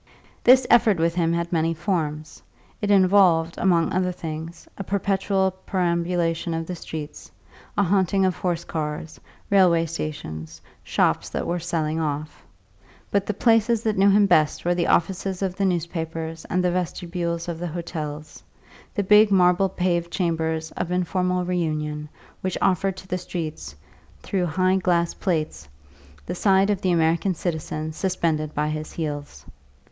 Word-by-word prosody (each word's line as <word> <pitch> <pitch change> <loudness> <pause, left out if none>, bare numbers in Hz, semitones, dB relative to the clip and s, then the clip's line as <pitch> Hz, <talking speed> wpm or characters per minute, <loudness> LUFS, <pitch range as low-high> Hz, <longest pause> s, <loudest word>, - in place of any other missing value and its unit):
This 255 +1 +6
effort 220 -4 +5
with 165 +1 +1
him 165 -1 +1
had 170 +1 -2
many 165 0 +1
forms; 155 -4 -3 0.4
it 205 - -1
involved, 185 -4 +4
among 170 -3 +2
other 180 0 +1
things, 165 -1 -7
a 195 - -5
perpetual 195 0 0 0.2
perambulation 170 -2 0
of 165 0 -3
the 180 - -5
streets, 155 -2 -8 0.5
a 200 - +4
haunting 195 0 +2
of 185 -2 +1
horse 175 -2 -2
cars, 155 -1 -5 0.3
railway 180 -4 +5
stations, 80 - -6 0.2
shops - - +1
that - - -3
were 175 +1 -1
"selling 160 -2 -2
off." 150 -1 -4 0.7
But 200 -1 +1
the 210 - -1
places 225 0 +3
that 220 -2 0
knew 195 +1 +5
him 205 +1 +5
best 160 -6 +2
were 175 - +3
the 175 -1 0
offices 190 +2 0
of 185 -2 -2
the 200 - 0
newspapers 165 -2 -3
and 180 0 0
the 180 - +2
vestibules 170 -1 -3
of 170 -2 -4
the 175 - -3
hotels 155 -3 -6 0.5
the 205 - +1
big 210 +2 +6
marble 185 0 +4
paved 175 -2 -1
chambers 160 -3 -1
of 175 - -4
informal 180 0 0
reunion 155 -4 -2 0.3
which 185 -1 -2
offer 195 +1 +2
to 185 0 -12
the 180 0 -2
streets, 165 - -6 0.5
through 185 -3 -1
high 185 +3 +2
glass 175 -2 +1
plates, 155 - -2 0.6
the - - -4
sight 195 +2 +3
of 200 - -1
the 185 - +1
American 170 +2 +2
citizen 155 -2 -3
suspended 160 -4 -1
by 150 +1 0
his 155 0 -5
heels. 145 - -5
175 Hz, 150 wpm, -24 LUFS, 160-190 Hz, 0.7 s, This